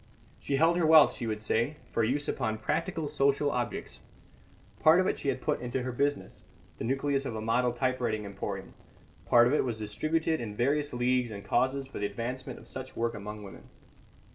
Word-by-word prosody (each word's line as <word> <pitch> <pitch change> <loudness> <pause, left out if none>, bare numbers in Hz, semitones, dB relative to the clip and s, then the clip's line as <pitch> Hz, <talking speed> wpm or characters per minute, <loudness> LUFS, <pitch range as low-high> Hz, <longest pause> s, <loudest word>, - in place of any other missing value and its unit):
She 140 - -1
held 165 +4 +4
her 175 - +2
wealth, 155 -1 +7
she 115 - -5
would 110 -1 -3
say, 115 +8 0
for 115 - +1
use 140 +6 0
upon 110 -4 -1
practical 160 - -2
social 145 0 +2
objects. 125 -1 -4 0.8
Part 160 +3 +6
of 185 - +3
it - - +1
she 140 - -2
had 130 - -2
put - - 0
into 125 +1 -2
her 130 - -3
business, 145 +4 -2 0.4
the - - -3
nucleus 135 +3 0
of 120 - -4
a - - -3
model 120 +3 +2
typewriting 120 -4 -1
emporium; 100 -1 -6 0.5
part 120 0 +6
of 125 - +2
it - - +3
was 120 -4 -2
distributed 155 +10 -1
in 105 -3 -5
various 145 +5 +1
leagues 125 0 +1
and 100 -2 -8
causes 130 +5 +1
for 135 - -8
the 100 - 0
advancement 120 +5 -5
of - - -14
such 130 0 -8
work 115 0 -1
among 105 +1 -7
women. 100 - -12
125 Hz, 195 wpm, -29 LUFS, 110-145 Hz, 0.8 s, wealth